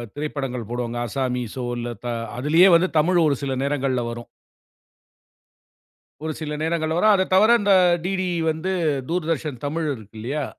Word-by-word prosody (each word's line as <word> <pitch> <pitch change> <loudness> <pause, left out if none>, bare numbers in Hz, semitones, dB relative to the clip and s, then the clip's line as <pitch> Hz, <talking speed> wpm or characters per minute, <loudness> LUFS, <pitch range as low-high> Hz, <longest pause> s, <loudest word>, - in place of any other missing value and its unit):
திரைப்படங்கள் 135 -6 -4
போடுவாங்க. 120 0 -3
அஸ்ஸாமிசோ 125 0 -3
இல்ல 120 0 -4
த - - -4 0.3
அதுலயே 160 +8 +5
வந்து 175 +3 +4
தமிழ் 175 +3 +3
ஒரு 140 - +2
சில 135 -1 -2
நேரங்கள்ல 135 -3 0
வரும். 120 0 -8 2.0
ஒரு 160 -1 -2
சில 150 -1 -4
நேரங்கள்ல 160 0 -1
வரும். 215 +4 +5
அதத் 190 0 0
தவற 215 +4 +6
இந்த 200 -1 +4 0.3
டிடி 185 -1 -1 0.2
வந்து 160 +4 -3 0.4
தூர்தர்ஷன் 160 -6 -2
தமிழ் 155 +2 -2
இருக்கு 110 -2 -12
இல்லையா? 140 +5 -3
150 Hz, 140 wpm, -23 LUFS, 125-170 Hz, 2.0 s, தவற